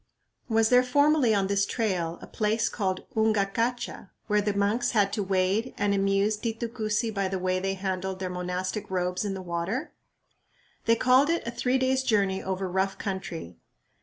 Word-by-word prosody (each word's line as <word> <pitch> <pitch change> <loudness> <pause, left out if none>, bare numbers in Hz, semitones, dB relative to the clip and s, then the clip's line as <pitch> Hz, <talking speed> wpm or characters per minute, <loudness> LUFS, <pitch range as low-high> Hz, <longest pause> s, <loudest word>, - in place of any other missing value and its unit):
Was 225 -1 +3
there 250 0 +6
formerly 285 0 +3
on 195 -1 +2
this 200 +1 +1
trail 185 -7 -1
a - - -6
place 220 +1 0
called 190 -4 -2
Ungacacha 220 +1 0 0.2
where 210 -1 +2
the 205 0 0
monks 205 +5 +1
had 200 -1 +3
to 210 - 0
wade, 195 +5 0
and 200 0 +1
amused 195 +2 +1
Titu 230 0 -2
Cusi 220 -1 -1
by 200 -2 0
the 190 0 -2
way 185 0 0
they 195 +1 -1
handled 190 0 -3
their 185 0 -3
monastic 180 +3 -3
robes 180 0 -1
in 200 -2 -2
the 190 - -6
water? 180 - -3 0.9
They 230 - +5
called 255 +5 +4
it 335 0 0
a 235 - -3
"three 250 +2 +1
days' 260 0 +2
journey 200 -6 +1
over 190 0 -2
rough 190 +1 -1
country." 175 - -5
200 Hz, 175 wpm, -27 LUFS, 190-230 Hz, 0.9 s, there